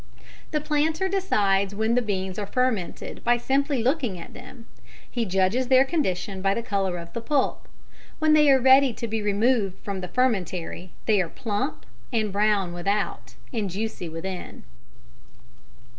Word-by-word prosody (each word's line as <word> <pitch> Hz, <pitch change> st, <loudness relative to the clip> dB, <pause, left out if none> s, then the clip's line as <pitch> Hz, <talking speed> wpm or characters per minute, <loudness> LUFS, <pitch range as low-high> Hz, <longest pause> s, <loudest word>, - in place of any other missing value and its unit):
] -, -, -22 dB
The -, -, +3 dB
planter 310 Hz, +4 st, 0 dB
decides 200 Hz, -, +1 dB
when 220 Hz, +2 st, +1 dB
the 250 Hz, -, +3 dB
beans 190 Hz, -3 st, -3 dB
are 205 Hz, -, -3 dB
fermented 240 Hz, -5 st, -2 dB
by 240 Hz, 0 st, +3 dB
simply 270 Hz, +1 st, 0 dB
looking 255 Hz, -, 0 dB
at -, -, -10 dB
them; 250 Hz, -1 st, -12 dB, 0.4 s
he 240 Hz, -2 st, -2 dB
judges 195 Hz, +6 st, +1 dB
their 260 Hz, +1 st, +6 dB
condition 195 Hz, -, -2 dB
by 195 Hz, +1 st, +2 dB
the 235 Hz, -, -2 dB
colour 195 Hz, -5 st, -1 dB
of 170 Hz, 0 st, -9 dB
the 235 Hz, -, -4 dB
pulp. 280 Hz, +2 st, 0 dB, 0.5 s
When 310 Hz, 0 st, +3 dB
they 300 Hz, -1 st, +6 dB
are 270 Hz, -1 st, +6 dB
ready 265 Hz, 0 st, +6 dB
to 235 Hz, -, -5 dB
be 220 Hz, 0 st, -2 dB
removed 205 Hz, -1 st, +1 dB
from 195 Hz, -2 st, -4 dB
the 180 Hz, -, -4 dB
fermentary 185 Hz, -5 st, -1 dB, 0.2 s
they 210 Hz, -3 st, +3 dB
are 170 Hz, -, -3 dB
plump, 230 Hz, +6 st, -3 dB, 0.3 s
and 215 Hz, -4 st, 0 dB
brown 200 Hz, -3 st, +1 dB
without, 200 Hz, +4 st, -2 dB, 0.2 s
and 215 Hz, -4 st, -1 dB
juicy 195 Hz, -2 st, -4 dB
within. 175 Hz, +3 st, -6 dB
215 Hz, 160 wpm, -25 LUFS, 190-260 Hz, 0.5 s, their